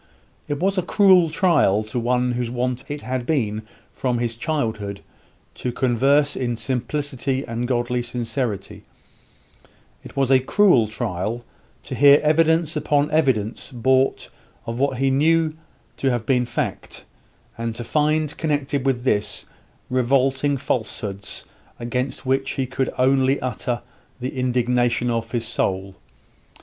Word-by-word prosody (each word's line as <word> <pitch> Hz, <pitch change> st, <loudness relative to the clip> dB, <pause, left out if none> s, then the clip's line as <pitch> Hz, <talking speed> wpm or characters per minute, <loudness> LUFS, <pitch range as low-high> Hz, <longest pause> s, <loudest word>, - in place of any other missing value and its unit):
It 145 Hz, -1 st, -2 dB
was 195 Hz, +2 st, +1 dB
a -, -, +2 dB
cruel 185 Hz, -2 st, +5 dB
trial 155 Hz, -, +3 dB
to 110 Hz, +3 st, -3 dB
one 125 Hz, +1 st, +1 dB
whose 120 Hz, -1 st, -2 dB
wont 125 Hz, +1 st, -2 dB
it 145 Hz, 0 st, -6 dB
had 130 Hz, -1 st, -2 dB
been 110 Hz, -8 st, -1 dB, 0.3 s
from 125 Hz, -2 st, -1 dB
his 120 Hz, -1 st, -1 dB
childhood 115 Hz, -7 st, -3 dB, 0.5 s
to 125 Hz, -, -4 dB
converse 135 Hz, +4 st, +2 dB
in 120 Hz, -2 st, -2 dB
"simplicity 135 Hz, +1 st, -2 dB
and 115 Hz, +1 st, -3 dB
godly 120 Hz, 0 st, 0 dB
sincerity," 120 Hz, -3 st, -4 dB, 1.2 s
it -, -, -12 dB
was 135 Hz, -1 st, +2 dB
a 130 Hz, -, +7 dB
cruel 130 Hz, -, +4 dB
trial 110 Hz, +1 st, -3 dB, 0.4 s
to -, -, -7 dB
hear 145 Hz, +1 st, +7 dB
evidence, 160 Hz, +1 st, +3 dB
upon 150 Hz, -1 st, +1 dB
evidence 130 Hz, -7 st, 0 dB
brought 130 Hz, +2 st, +1 dB, 0.3 s
of 115 Hz, +1 st, -4 dB
what 135 Hz, -1 st, +1 dB
he 135 Hz, +1 st, +2 dB
knew 155 Hz, +3 st, +2 dB, 0.4 s
to 135 Hz, -, +1 dB
have 120 Hz, -3 st, -1 dB
been 125 Hz, -1 st, +2 dB
fact, 120 Hz, -, -4 dB, 0.5 s
and 115 Hz, -1 st, -4 dB
to 120 Hz, -, -5 dB
find 150 Hz, +3 st, +1 dB
connected 145 Hz, -3 st, -1 dB
with 125 Hz, -2 st, 0 dB
this, 105 Hz, -5 st, 0 dB, 0.4 s
revolting 135 Hz, +2 st, +1 dB
falsehoods, 105 Hz, -5 st, -4 dB, 0.3 s
against 125 Hz, +3 st, -3 dB
which 135 Hz, +1 st, +1 dB
he 135 Hz, -, -1 dB
could 130 Hz, +1 st, -2 dB
only 135 Hz, +1 st, +3 dB
utter 120 Hz, -1 st, -3 dB, 0.4 s
the 130 Hz, +2 st, -4 dB
indignation 125 Hz, -1 st, +1 dB
of 115 Hz, -1 st, -2 dB
his 115 Hz, 0 st, -2 dB
soul. 95 Hz, -4 st, -1 dB
130 Hz, 135 wpm, -22 LUFS, 120-140 Hz, 1.2 s, a